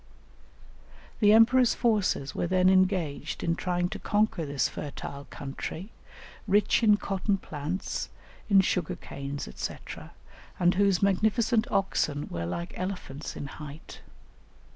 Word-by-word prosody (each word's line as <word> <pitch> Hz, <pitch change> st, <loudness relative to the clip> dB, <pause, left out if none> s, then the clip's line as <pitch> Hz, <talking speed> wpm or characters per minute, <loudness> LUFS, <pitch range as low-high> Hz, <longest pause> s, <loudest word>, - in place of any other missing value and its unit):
The 210 Hz, -2 st, +6 dB
emperor's 235 Hz, +3 st, +6 dB
forces 205 Hz, -, +1 dB
were -, -, -1 dB
then 185 Hz, +1 st, +4 dB
engaged 185 Hz, -5 st, +1 dB
in 165 Hz, -, +1 dB
trying 175 Hz, 0 st, -1 dB
to -, -, -6 dB
conquer 205 Hz, -6 st, 0 dB
this 140 Hz, -1 st, +1 dB
fertile 140 Hz, -1 st, -7 dB
country, 160 Hz, +8 st, -6 dB, 0.6 s
rich 205 Hz, +3 st, +3 dB
in 210 Hz, -2 st, +5 dB
cotton 195 Hz, 0 st, -1 dB
plants, 155 Hz, +2 st, -4 dB, 0.4 s
in 195 Hz, -2 st, +7 dB
sugar 180 Hz, -3 st, -1 dB
canes, 140 Hz, +1 st, -6 dB
&c., -, -, -4 dB, 0.8 s
and 175 Hz, 0 st, +4 dB
whose 195 Hz, -1 st, +2 dB
magnificent 220 Hz, +4 st, +2 dB
oxen 150 Hz, -6 st, 0 dB
were 85 Hz, -1 st, -3 dB
like 170 Hz, -, -4 dB
elephants 180 Hz, -7 st, -5 dB
in -, -, -5 dB
height. 150 Hz, +1 st, -10 dB
185 Hz, 120 wpm, -28 LUFS, 150-205 Hz, 0.8 s, in